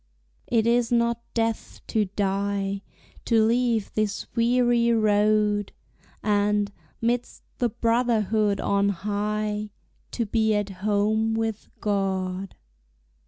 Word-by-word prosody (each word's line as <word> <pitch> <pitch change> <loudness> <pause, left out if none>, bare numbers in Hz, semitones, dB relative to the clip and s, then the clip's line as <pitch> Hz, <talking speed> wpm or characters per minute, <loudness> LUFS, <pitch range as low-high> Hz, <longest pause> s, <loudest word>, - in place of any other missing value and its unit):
It 225 -2 +2
is 235 0 +2
not 235 0 +2
death 225 -1 -1
to 215 -2 +2
die, 200 0 -1 0.4
To 225 -2 +4
leave 230 -2 +1
this 215 -1 -1
weary 240 0 +3
road, 210 -1 +2 0.5
And, 205 -1 +1 0.3
midst 240 +1 -1 0.2
the 245 - +2
brotherhood 225 -3 +1
on 200 0 +2
high, 210 +2 -2 0.4
To 235 - -1
be 220 0 +1
at 205 -1 -1
home 215 +2 +1
with 225 -1 -3
God. 195 -2 -1
215 Hz, 105 wpm, -25 LUFS, 205-230 Hz, 0.5 s, To